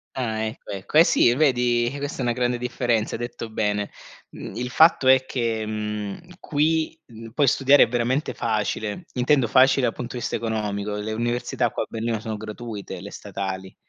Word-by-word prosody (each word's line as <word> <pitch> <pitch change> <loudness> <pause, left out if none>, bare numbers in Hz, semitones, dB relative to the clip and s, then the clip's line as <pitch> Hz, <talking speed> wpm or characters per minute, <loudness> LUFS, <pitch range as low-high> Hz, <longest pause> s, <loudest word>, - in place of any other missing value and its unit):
Ah, 110 -4 -2
ecco, 110 -1 -6
ecco. 100 +10 -1
Eh 165 - +9
sì, 120 - +4
vedi, 125 -4 +2
eh, 140 - -7
questa 145 0 -5
è - - -3
una 120 -1 +1
grande 125 0 0
differenza, 120 -2 -1
hai - - -4
detto 120 -1 -5
bene. 105 -2 -1 0.4
Mhmm, 100 - -8
il 125 +1 -3
fatto 155 0 +5
è 130 0 +6
che, 115 -4 -2
mhmm, 105 -2 -4 0.2
qui, 160 +1 0
uhm, 115 -1 -11
puoi 145 +3 +2
studiare 140 +2 +5
veramente 125 +5 -1
facile, 110 - -2
intendo 130 +1 +3
facile, 130 +3 +4
dal - - -1
punto 125 0 -6
di - - -2
vista - - -2
economico; 105 -2 -2
le 105 +1 -3
università 120 +2 -1
qua - - -2
a - - -16
Berlino 115 -1 -2
sono 110 -1 -4
gratuite, 110 0 -7
le - - -8
statali, 95 -1 -6
120 Hz, 185 wpm, -24 LUFS, 110-130 Hz, 0.4 s, Eh